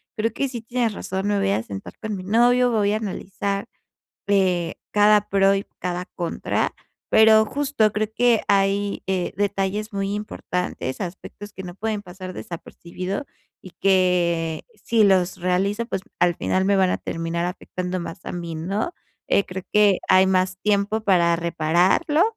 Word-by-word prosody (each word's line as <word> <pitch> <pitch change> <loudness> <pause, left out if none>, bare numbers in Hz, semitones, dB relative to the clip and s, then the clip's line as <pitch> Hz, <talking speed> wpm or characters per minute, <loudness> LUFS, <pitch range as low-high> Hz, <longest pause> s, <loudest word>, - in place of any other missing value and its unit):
creo 220 +1 -1
que 275 - -1
sí 240 -3 -6
tienes 235 -1 -1
razón, 190 0 -3
me 205 -1 +1
voy 195 0 +1
a 110 - +1
sentar 100 -3 -8
con 215 -2 -4
mi 185 - -6
novio, 245 +5 +4
voy 210 -2 +2
a - - +1
analizar, 200 0 -4 0.6
eh, 185 -4 +1 0.2
cada 210 0 +4
pro 195 0 +4
y 195 0 -2
cada 180 0 -3
contra, 170 -2 -1 0.4
pero 220 0 +6
justo 275 -4 +1
creo 215 +1 -2
que 240 -2 +3
hay, 200 +1 +1
eh, 185 -2 -1
detalles 205 +2 -1
muy 195 0 -1
importantes, 180 -9 -4
aspectos 195 +2 -7
que 190 - -7
no 175 -1 -8
pueden 215 +1 -3
pasar 185 0 -8
desapercibido, 180 - -6 0.4
y 185 - -11
que 175 -4 +2 0.2
si 230 -1 +3
los 185 -2 +3
realizo, 190 +5 0
pues 195 - -3 0.2
al 175 -1 +4
final 190 0 0
me 200 0 +3
van 190 -1 +3
a - - 0
terminar 165 +1 -3
afectando 180 0 -4
más 170 -1 -7
a - - -3
mí, 170 -2 -5
¿no? 195 - -2 0.3
Eh, - - +3
creo 185 0 -6
que 205 -3 +5
hay 185 0 +6
más 185 0 +1
tiempo 210 +1 +1
para 175 -5 +3
repararlo, 175 - +2
195 Hz, 165 wpm, -23 LUFS, 180-210 Hz, 0.6 s, pero